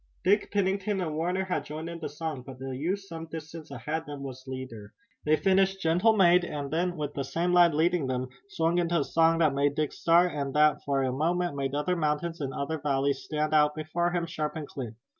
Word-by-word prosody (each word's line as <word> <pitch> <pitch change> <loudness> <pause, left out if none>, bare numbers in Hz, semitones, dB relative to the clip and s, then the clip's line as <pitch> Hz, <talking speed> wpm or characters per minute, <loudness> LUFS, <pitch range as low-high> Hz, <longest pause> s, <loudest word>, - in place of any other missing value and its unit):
Dick, 200 +3 +3
Pennington 200 0 0
and 165 -4 -2
Warner 180 +4 0
had 185 - -1
joined 155 +2 -6
in 170 0 -6
the 165 - -4
song, 150 -2 -5
but 130 0 -10
the 130 0 -5
youth 175 +9 -1
some 165 -4 -8
distance 160 0 -8
ahead 155 +1 -3
of 160 - -14
them 145 -1 -7
was 130 -1 -8
leader. 130 -6 -7 0.3
They 155 +1 +4
finished 195 +2 +2
"Gentle 185 +6 +3
Maid" 180 -2 +6
and 145 -4 -4
then, 175 +2 0
with 145 -1 -3
the 140 - -3
same 170 +6 -1
lad 175 -3 +6
leading 165 -2 +2
them, 130 0 -2 0.2
swung 165 -1 +1
into 170 -2 +1
a - - +1
song 165 +2 +3
that 155 -4 +3
made 140 +1 +1
Dick 155 -1 -1
start 175 +2 +4
and 140 -2 -3
that 150 0 +4
for 140 -1 +1
a 130 - 0
moment 170 +4 0
made 135 0 -2
other 165 +5 0
mountains 165 +1 -1
and 135 -2 -2
another 145 +4 -3
valley 140 -1 +1
stand 155 +1 -3
out 150 -1 +4
before 155 +3 -1
him, 175 -1 -1
sharp 155 -2 -3
and 155 -2 -5
clear. 120 -5 -7
155 Hz, 225 wpm, -28 LUFS, 140-175 Hz, 0.3 s, Maid